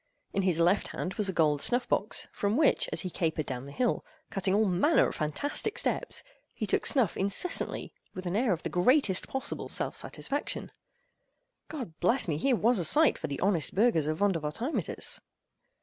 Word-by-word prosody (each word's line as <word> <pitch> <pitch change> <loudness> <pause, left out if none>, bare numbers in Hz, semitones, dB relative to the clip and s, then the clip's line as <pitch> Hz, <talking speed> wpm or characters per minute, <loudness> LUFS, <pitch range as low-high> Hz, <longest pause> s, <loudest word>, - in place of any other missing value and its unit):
In 195 - +1
his 185 -4 +1
left 175 +4 +2
hand 185 - -5
was 200 +1 -1
a - - +1
gold 150 -5 +1
snuff 245 +1 +3
box, 205 - +1
from 205 +3 -1
which, 305 -2 +3
as - - +3
he 185 - -5
capered 160 -3 -2
down 130 0 -6
the - - -9
hill, 245 - -1 0.3
cutting 195 -1 +1
all 215 +1 +3
manner 195 - +3
of - - -5
fantastic 285 - -2
steps, - - 0 0.3
he - - -3
took - - 0
snuff 255 - +3
incessantly 200 - 0 0.2
with 185 0 -7
an 175 +1 -2
air 235 0 +2
of 170 -2 -2
the - - -3
greatest 195 +1 +2
possible 265 - -4
self - - -2
satisfaction. 285 +1 -4 1.0
God 255 - -7
bless 230 +8 +3
me!—here 165 - +1
was 235 0 +2
a - - 0
sight 295 - +4
for 160 - -4
the 140 -2 -5
honest 185 -5 +1
burghers 195 -8 +2
of 155 0 -1
Vondervotteimittiss! 195 - -1
195 Hz, 180 wpm, -29 LUFS, 165-245 Hz, 1.0 s, sight